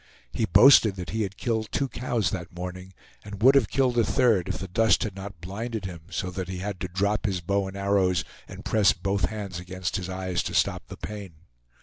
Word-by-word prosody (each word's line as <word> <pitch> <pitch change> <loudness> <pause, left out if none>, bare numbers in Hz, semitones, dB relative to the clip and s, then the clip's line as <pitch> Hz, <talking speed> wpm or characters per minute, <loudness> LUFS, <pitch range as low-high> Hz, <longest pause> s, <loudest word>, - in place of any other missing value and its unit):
He 115 - 0
boasted 105 +2 +7
that 90 -2 -6
he 110 - -1
had 100 -1 -3
killed 110 -3 -2
two 140 - 0
cows 120 -6 -1
that 85 -2 -6
morning, 90 +1 -7 0.3
and 105 +1 -7
would 135 +2 +8
have 135 -6 +3
killed 125 -3 +2
a - - +5
third 110 -3 +2
if - - -2
the 95 - -6
dust 110 +3 +3
had 105 -4 -4
not 95 -2 -8
blinded 110 +4 -5
him 90 -3 -7
so 90 -2 -3
that 95 -1 -4
he 95 - -4
had 95 0 -4
to 95 - -3
drop 100 +4 0
his 95 -2 -1
bow 100 +3 -1
and 95 +1 -7
arrows 95 -3 +2 0.2
and - - -10
press 105 -2 +4
both 95 +1 -1
hands 100 -2 -5
against 90 +1 -4
his 90 -1 -5
eyes 95 -1 -2
to - - -4
stop - - +1
the - - -9
pain. 100 -4 -7
100 Hz, 225 wpm, -26 LUFS, 90-110 Hz, 0.3 s, would